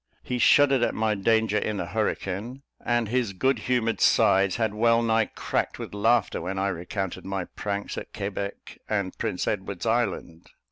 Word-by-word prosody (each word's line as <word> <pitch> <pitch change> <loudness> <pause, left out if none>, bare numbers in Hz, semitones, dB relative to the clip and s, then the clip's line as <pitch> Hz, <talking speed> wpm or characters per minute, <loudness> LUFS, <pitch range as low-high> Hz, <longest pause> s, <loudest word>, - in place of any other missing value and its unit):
He 125 -1 -3
shuddered 135 0 +5
at - - +1
my 110 -1 +1
danger 110 +1 +2
in 105 0 -2
the 90 - -2
hurricane, 110 +5 -3 0.2
and 120 -2 +1
his 120 -2 0
good 130 +8 +1
humoured 120 -3 0
sides 95 -1 +4
had 110 -3 0
well 115 +2 +3
nigh 115 -1 +2
cracked - - -2
with - - -7
laughter 110 +1 +2
when 95 +1 -4
I 100 +1 +1
recounted 90 +1 -4
my 95 -2 -3
pranks 100 +1 -4
at - - -11
Quebec 100 0 -5
and 100 -3 -1
Prince 90 - -2
Edward's 95 0 -3
Island. 110 -8 -1
105 Hz, 170 wpm, -26 LUFS, 95-115 Hz, 0.2 s, shuddered